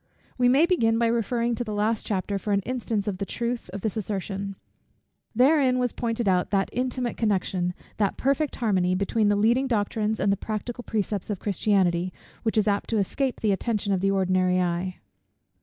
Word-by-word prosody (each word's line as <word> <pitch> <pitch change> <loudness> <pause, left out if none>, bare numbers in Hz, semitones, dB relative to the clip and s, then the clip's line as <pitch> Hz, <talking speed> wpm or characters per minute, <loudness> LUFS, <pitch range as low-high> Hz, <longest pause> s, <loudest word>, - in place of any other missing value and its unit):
We 245 -1 +3
may 275 +6 +5
begin 230 -11 +2
by 235 - +2
referring 235 +1 +1
to 235 - -2
the 215 -3 -4
last 215 +1 0
chapter 200 0 -1
for 205 +1 -1
an 200 - +2
instance 225 -3 -2
of 190 -3 -2
the - - -1
truth 235 -1 -3
of 195 +2 -6
this 220 +1 -2
assertion. 195 -1 -3 0.8
Therein 260 0 +4
was 250 -2 0
pointed 230 -2 -2
out 180 -2 +2
that 195 -1 0
intimate 250 -1 -2
connection, 185 -4 0 0.2
that 200 -2 0
perfect 275 +2 0
harmony, 185 -6 +1
between 205 +3 +1
the 205 - +3
leading 235 +6 +3
doctrines 215 -1 0
and 200 - +2
the 200 - +1
practical 225 +4 -5
precepts 205 -3 -2
of 205 - -1
Christianity, 185 -3 +1 0.3
which 225 -1 -1
is 215 0 +3
apt 200 -1 0
to 225 - +1
escape 255 +6 -1
the 215 - +2
attention 205 0 0
of 185 - 0
the 195 - +2
ordinary 185 -1 +2
eye. 180 +1 -1
210 Hz, 190 wpm, -26 LUFS, 195-235 Hz, 0.8 s, may